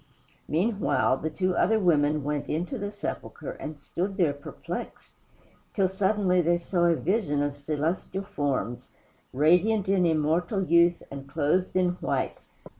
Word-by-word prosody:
Meanwhile, 195 - +1
the 160 - -3
two 185 +3 -1
other 220 +4 +3
women 150 -5 +2
went 145 0 -2
into 175 - -2
the 205 0 -3
sepulchre - - -6
and 155 -1 -7
stood 185 +7 -4
there 165 -7 +3
perplexed, 145 0 -7 0.6
till 195 -2 +3
suddenly 190 -1 +2
they 175 +1 +2
saw 175 0 0
a 170 -1 +4
vision 160 -5 0
of 145 -1 -2
celestial 155 +6 -2
forms, 135 - -3 0.4
radiant 180 +9 +3
in 190 -2 +3
immortal 165 +5 +1
youth 170 0 +4
and 140 0 -8
clothed 160 +6 0
in 185 -1 +3
white. - - -1
170 Hz, 140 wpm, -27 LUFS, 150-190 Hz, 0.6 s, a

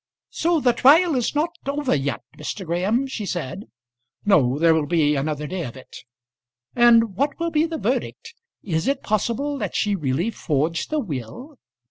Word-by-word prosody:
"So 335 0 +1
the 250 -4 +3
trial 310 +8 +5
is 250 +1 -1
not 310 +3 +1 0.2
over 285 -1 0
yet, 140 -1 -2
Mr. 195 - -6
Graham?" 190 +10 0
she 260 -5 -5
said. 180 0 -4 0.6
"No; 140 -10 +3
there 165 +1 +4
will 155 -2 0
be 150 -3 +2
another 150 +1 -2
day 180 +3 -4
of 125 -2 -7
it." 130 - -14 0.8
"And 230 -4 +5
what 280 - -1
will 335 0 -1
be 310 0 +2
the 325 -1 -4
verdict? 460 +8 -3 0.3
Is 160 -4 -2
it 275 0 0
possible 245 +7 -1
that - - -4
she 205 -1 +1
really 160 - -1
forged 160 -2 -1
the 310 - -1
will?" 235 - -7
210 Hz, 170 wpm, -22 LUFS, -, 0.8 s, trial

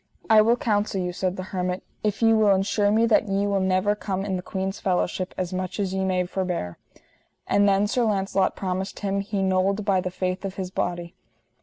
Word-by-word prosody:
I 215 -1 +8
will 230 +3 +3
counsel 205 -4 0
you, 180 -1 -2
said 185 +1 -2
the 185 - -4
hermit, 180 0 -2 0.2
if 210 +1 -1
ye 225 0 +6
will 215 -3 +4
ensure 205 +2 +1
me 220 +2 +3
that 220 -1 +3
ye 195 +1 +1
will 200 -1 +1
never 190 +2 +2
come 195 -2 -3
in 195 -2 -1
that 180 - -3
queen's 190 +1 -3
fellowship 185 0 -1
as 185 0 -3
much 185 +2 -4
as 190 -2 -1
ye 190 0 -1
may 185 -1 +1
forbear. 180 - -3 0.7
And 205 0 +3
then 195 +1 +3
Sir 240 +4 0
Launcelot 195 -2 +1
promised 190 0 -4
him 200 -1 -1
he 200 0 -2
nold, 190 +2 +1
by 195 -3 +2
the 185 - -3
faith 185 +1 -3
of 195 -1 -4
his 185 -1 -5
body. 175 -2 -3
195 Hz, 210 wpm, -24 LUFS, 185-205 Hz, 0.7 s, I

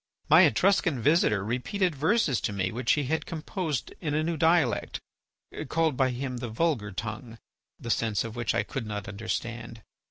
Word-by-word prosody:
My - - +8
Etruscan 175 - +2
visitor 115 - +3
repeated 165 - -1
verses 155 - +1
to - - -1
me 95 -2 -1
which 125 +3 +1
he 150 - 0
had 160 +5 -2
composed 160 -2 -3
in 150 -4 -1
a 155 - +1
new 165 +1 -1
dialect, 160 -5 +2 0.7
called 160 -3 +1
by 130 0 +2
him 125 0 -4
the 120 -1 -5
vulgar 115 -4 0
tongue, 110 +3 -6 0.4
the 115 - -3
sense 110 -4 0
of 115 0 -7
which 120 -4 -1
I - - +2
could 115 +1 -5
not 105 -1 -5
understand. 115 +2 -5
125 Hz, 170 wpm, -27 LUFS, 110-160 Hz, 0.7 s, My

